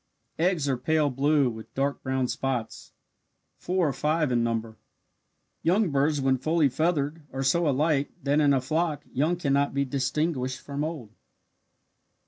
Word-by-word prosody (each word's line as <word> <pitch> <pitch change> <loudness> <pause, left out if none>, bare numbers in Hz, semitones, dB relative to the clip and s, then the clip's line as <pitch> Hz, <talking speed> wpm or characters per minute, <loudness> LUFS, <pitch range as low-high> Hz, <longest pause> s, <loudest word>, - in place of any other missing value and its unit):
Eggs 170 -4 +1
are 135 -2 +1
pale 150 +2 +1
blue 140 +2 +2
with 110 -2 -7
dark 140 +1 -1
brown 130 -1 -1
spots. 125 -3 -3 0.7
Four 180 -2 0
or - - -2
five 150 +1 0
in 120 -1 +2
number. 115 -1 -2 0.8
Young 185 +2 +2
birds 145 +2 +2
when 135 -1 +1
fully 155 +1 +2
feathered 155 +2 0
are 135 +1 -3
so 160 +4 +2
alike 145 +1 +1
that 145 +2 +2
in 145 -2 +4
a 135 -2 +3
flock 155 +2 -1
young 155 +7 +1
cannot 140 -4 0
be 140 0 +1
distinguished 135 0 -1
from 140 +1 -4
old. 150 -9 -5
140 Hz, 150 wpm, -26 LUFS, 130-155 Hz, 0.8 s, in